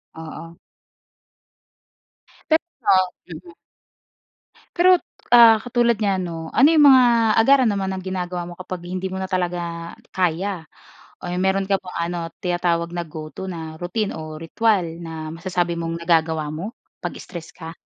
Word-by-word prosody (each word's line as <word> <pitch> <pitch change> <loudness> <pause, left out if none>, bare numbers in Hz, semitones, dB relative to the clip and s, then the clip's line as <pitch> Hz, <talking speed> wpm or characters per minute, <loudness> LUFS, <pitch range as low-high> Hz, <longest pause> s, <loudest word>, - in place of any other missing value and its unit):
Oo. 160 +1 -9 1.9
Pero, 315 +1 +5 0.7
mm. 170 0 -11 1.2
Pero, 365 +1 +6 0.4
ah, 230 -2 +9
katulad 240 -1 +2
niyan 195 -3 +1
'no, 170 - -5 0.2
ano 275 - +7
'yung 300 -2 +6
mga 260 -1 +8 0.4
agaran 260 +1 +5
naman 195 -2 -1
ng 190 - -5
ginagawa 180 -1 -3
mo - - -8
kapag 185 -1 -6
hindi 185 +1 -4
mo 190 - -5
na 190 - -4
talaga 175 -2 -3 0.2
kaya. 180 0 -1 0.6
Eh, 180 +1 -3
meron 190 +1 +2
ka 195 - +3
bang 180 -1 -8
ano 175 - -3 0.3
tinatawag 175 -1 0
na 175 - -2
go-to 155 +4 -8
na 160 -2 -7
routine 195 +4 -2
o 155 -1 -7
ritwal 200 +3 +1 0.2
na 160 -2 -6
masasabi 175 0 -2
mong 165 0 -3
nagagawa 160 -3 +1
mo 185 +9 -5 0.3
pag-stress 170 -3 -7
ka? 165 -1 -9
175 Hz, 135 wpm, -22 LUFS, 165-195 Hz, 1.9 s, ah